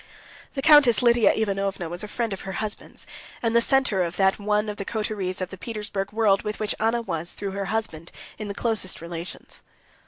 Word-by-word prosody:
The 270 - -2
Countess 280 -8 +7
Lidia 235 -2 +5
Ivanovna 195 -4 -1
was 175 +4 -5
a - - -4
friend 225 0 -2
of 190 - -6
her 190 - -6
husband's, 215 0 -5 0.4
and 230 0 +1
the 235 - +6
center 270 -6 +3
of 175 0 -2
that 195 +1 +3
one 210 +1 +1
of 210 0 -4
the 200 - -3
coteries 205 -4 -2
of 185 - -3
the 190 - -9
Petersburg 205 -3 -4
world 210 -3 +3
with 210 0 -4
which 215 -1 -1
Anna 230 +2 +1
was, 170 -4 -3
through 200 -1 -4
her 195 0 -3
husband, 190 -7 -3 0.3
in 215 - -4
the 200 - -5
closest 220 -5 0
relations. 170 +1 -7
205 Hz, 200 wpm, -25 LUFS, 190-225 Hz, 0.4 s, Countess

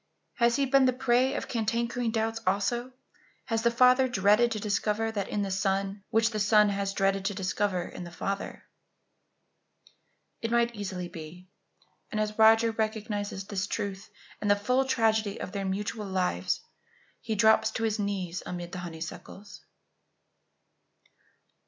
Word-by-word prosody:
Has 235 -1 +3
he 280 - +2
been 270 0 +4
the 255 - +3
prey 255 +1 +2
of - - -3
cankering 235 +1 -1
doubts 225 0 -1
also? 235 +6 0 0.5
Has 225 -3 -1
the 235 - +3
father 250 +2 +5
dreaded 215 +1 +3
to 215 - -2
discover 210 +2 0
that 200 -3 -3
in 205 - -1
the 195 - -3
son 195 +1 -1
which 225 +1 +2
the 215 - -2
son 210 0 +5
has 200 0 -1
dreaded 195 0 +1
to 200 0 -1
discover 185 -1 -1
in 180 - -8
the 175 - -8
father? 195 +3 -4 1.8
It 230 - -2
might 235 0 +2
easily 190 -4 -5
be; 175 +1 -10 0.6
and 215 - -2
as 215 0 -2
Roger 225 +1 +6
recognizes 215 -3 -3
this 200 0 -3
truth 200 -1 -4 0.3
and 205 - -1
the 205 - +6
full 250 +6 +1
tragedy 220 -5 +1
of - - -5
their 200 -1 -3
mutual 205 +2 -3
lives, 180 - -1 0.6
he 220 - -3
drops 220 +1 +4
to 225 - -4
his 220 -1 0
knees 190 -4 -2
amid 175 -1 -6
the 185 - -5
honeysuckles. 175 +4 -8
210 Hz, 150 wpm, -28 LUFS, 195-225 Hz, 1.8 s, Roger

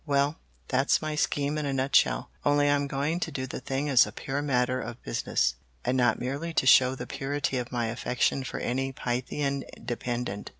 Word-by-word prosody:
Well, 145 0 +1 0.3
that's 135 +2 +2
my 155 0 -2
scheme 150 0 0
in 150 - -2
a 140 - -1
nutshell, 130 - +2
only 145 0 +3
I 145 - +4
am 140 0 +1
going 145 +5 -1
to - - -3
do 130 - -3
the 130 - -6
thing 135 +2 -2
as 130 -4 +6
a - - -7
pure 140 +2 -3
matter 130 -2 +1
of 120 - -7
business, - - 0 0.3
and 125 +1 +1
not 120 -3 +3
merely 145 +7 -3
to - - +2
show 130 0 +6
the - - -6
purity 135 -1 -2
of 120 0 -5
my 120 -1 0
affection 125 +3 0
for - - -5
any 135 +2 -1
Pythian 135 +3 -2 0.2
dependent. 120 -4 -3
135 Hz, 200 wpm, -28 LUFS, 125-145 Hz, 0.3 s, as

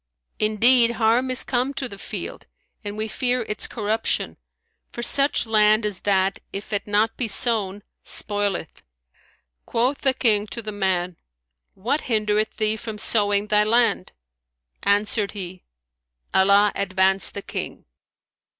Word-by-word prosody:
Indeed, 235 +3 +4
harm 235 +3 +1
is 255 - +3
come 260 +2 -2
to 260 - -2
the 200 -4 -11
field, - - -7 0.4
and 205 0 -6
we 215 +1 -3
fear 250 +2 -1
its 210 -1 0
corruption, 220 0 -2 0.5
for 235 - -6
such 280 +2 +3
land 215 0 +3
as 205 -4 -1
that 195 -1 +1
if 200 +2 -7
it 200 -1 -1
be 205 - -12
not 215 +2 +2 0.2
sown, 205 -2 +2 0.2
spoileth." 205 -5 -3 0.9
Quoth 250 +5 0
the 265 -2 +2
King 210 -3 +1
to 235 +3 -6
the 215 - -5
man, 185 -3 -2 0.6
"What 250 +10 -1
hindereth 215 -2 0
thee 215 0 0
from 220 0 -7
sowing 205 -1 +3
thy 210 0 +2
land?" 225 -3 +1 0.7
Answered 205 +1 0
he, 185 -3 -7 0.7
"Allah 200 +2 +4
advance 190 0 +1
the 200 - -7
King! - - -7
210 Hz, 135 wpm, -22 LUFS, 200-230 Hz, 0.9 s, Indeed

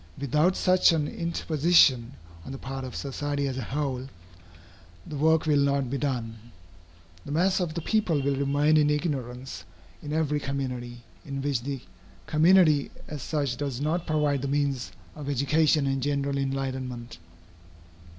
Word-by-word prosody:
Without 150 +7 +2
such 185 -1 +4
an 150 -3 0
interposition 160 -7 +2 0.3
on - - -8
the 135 - -5
part 135 0 -6
of 130 - -7
society 145 +1 -2
as 130 -1 -3
a - - -2
whole, 130 +1 -3 1.0
the 150 - -7
work 160 +2 +3
will 150 -2 +3
not 140 -2 +1
be 140 - -1
done. 120 -5 -3 0.8
The - - -8
mass 180 +6 +2
of 170 -4 -2
the 170 - -3
people 205 -9 +1
will 140 0 0
remain 145 +3 +2
in 150 -1 +4
ignorance 130 - -3 0.4
in 145 - -6
every 150 -1 0
community, 125 -4 -4 0.2
in 140 -1 -5
which 140 -4 0
the 135 0 -4 0.4
community 155 -2 +4 0.2
as 150 -2 -6
such 140 -4 -1
does 140 -3 -3
not 160 +4 -1
provide 150 -3 +1
the 140 - -2
means 140 -2 -1 0.2
of 145 -2 -6
education 145 +2 +2
and 135 -1 0
general 140 0 -1
enlightenment. 130 -4 -4
140 Hz, 150 wpm, -27 LUFS, 135-155 Hz, 1.0 s, such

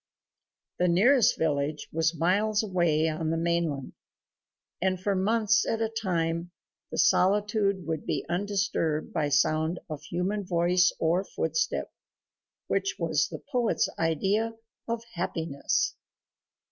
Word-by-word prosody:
The 180 - +3
nearest 225 +9 +4
village 150 -1 -1
was 165 +1 +1
miles 205 +6 +2
away 170 -6 +1
on 155 0 -2
the 165 - 0
mainland, 165 -5 -1 0.9
and 185 0 +1
for 200 +2 0
months 215 +3 +2
at 225 - -1
a 225 -1 0
time 170 -3 -1 0.4
the - - -6
solitude 200 -1 +2
would 160 -1 -4
be - - -1
undisturbed 180 -4 -1
by 150 -3 0
sound 155 +4 +2
of 150 - -5
human 180 +6 -2
voice 180 0 +3
or 170 +4 +1
footstep 485 - -2 0.7
which 390 - -1
was - - +1
the - - -9
poet's 245 -4 +1
idea 195 +8 0 0.3
of 230 0 -2
happiness. 165 -4 -1
175 Hz, 120 wpm, -28 LUFS, 160-205 Hz, 0.9 s, nearest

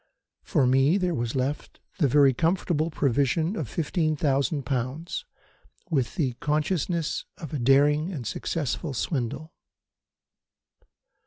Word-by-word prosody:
For 150 -9 +1
me 135 +7 +4
there 180 -3 0
was 120 -3 -2
left 135 +3 -3 0.2
the 150 - +4
very 140 0 +5
comfortable 165 +1 0
provision 145 - +1
of 150 - -4
15,000 150 - 0
pounds, 135 - -3 0.7
with 135 -6 0
the 140 -9 0
consciousness 155 +2 -1
of 155 -7 -8
a 145 - -1
daring 145 +6 +3
and 140 -10 -5
successful 145 - -3
swindle. 140 +4 -3
150 Hz, 110 wpm, -26 LUFS, 135-165 Hz, 0.7 s, very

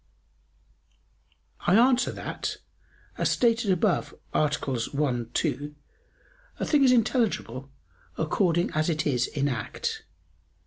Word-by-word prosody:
I 175 - +5
answer 245 +2 +4
that, - - -4 0.6
As - - +2
stated 230 -3 +2
above 185 0 +1 0.2
(AA. 150 - +3
1, 125 -2 -2
2) 145 +1 -2 0.8
a - - -1
thing 295 -3 +3
is 260 - +6
intelligible 225 - +1 0.5
according 170 +2 +1
as 155 +2 0
it 160 -1 0
is 125 -4 +1
in 140 0 -1
act. 120 -6 -3
160 Hz, 105 wpm, -27 LUFS, 140-230 Hz, 0.8 s, is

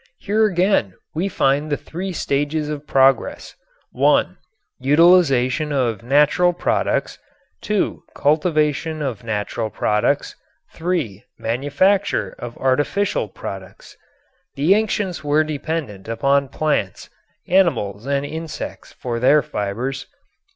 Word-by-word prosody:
Here 215 +2 +2
again 180 - +1 0.2
we 180 +5 -1
find 145 -1 +1
the 145 - +1
three 185 +7 -6
stages 150 -1 -1
of 150 -1 -6
progress, 135 0 +2 0.4
(1) - - +2 0.4
utilization 150 -2 +4
of 120 -7 0
natural 150 +8 +3
products, 175 - -1 0.4
(2) 210 -3 -1
cultivation 155 0 +1
of 120 -7 -4
natural 110 0 -3
products, 105 0 0 0.4
(3) 160 - -2
manufacture 145 - 0
of 120 -1 -7
artificial 145 - 0
products. 95 -1 -9 0.6
The 150 +7 +4
ancients 200 -6 -1
were 150 +1 +3
dependent 150 -9 -4
upon 135 +4 +1
plants, 145 -11 -2 0.4
animals 130 - +1
and 140 0 0
insects 160 +1 -7
for 120 -2 -4
their 140 +4 +4
fibers. 120 +7 -4
145 Hz, 105 wpm, -20 LUFS, 125-165 Hz, 0.6 s, utilization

